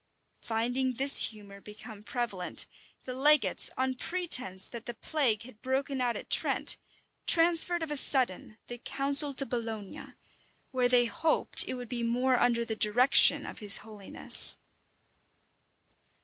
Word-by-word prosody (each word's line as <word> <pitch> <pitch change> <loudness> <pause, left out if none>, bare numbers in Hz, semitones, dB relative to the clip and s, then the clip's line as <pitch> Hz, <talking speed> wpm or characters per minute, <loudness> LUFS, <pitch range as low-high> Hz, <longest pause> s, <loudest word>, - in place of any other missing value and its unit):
Finding 245 +3 -3
this 275 +3 +4
humor 200 -2 -11
become 210 0 -13
prevalent, 210 -5 -5 0.4
the 255 - -8
legates, 295 +3 +5
on 260 0 -3
pretence 255 - 0
that 235 -1 -12
the 240 - -8
plague 250 -9 -2
had 230 -3 -17
broken 265 +1 -4
out 245 -1 -3
at - - -12
Trent, - - +3 0.5
transferred 340 0 +4
of 315 - -7
a - - -4
sudden 245 -6 0
the 240 0 -11
council 280 +3 +1
to 275 - -1
Bologna, 225 -5 -8 0.6
where 250 -1 -1
they 245 -1 +2
hoped 315 +7 0
it - - -5
would 245 -1 -10
be 240 0 -6
more 250 +2 -1
under 235 -1 -1
the 225 - -6
direction 235 +5 +2
of - - -10
his 205 -2 +7
holiness. 210 -3 -4
245 Hz, 140 wpm, -27 LUFS, 220-270 Hz, 0.6 s, his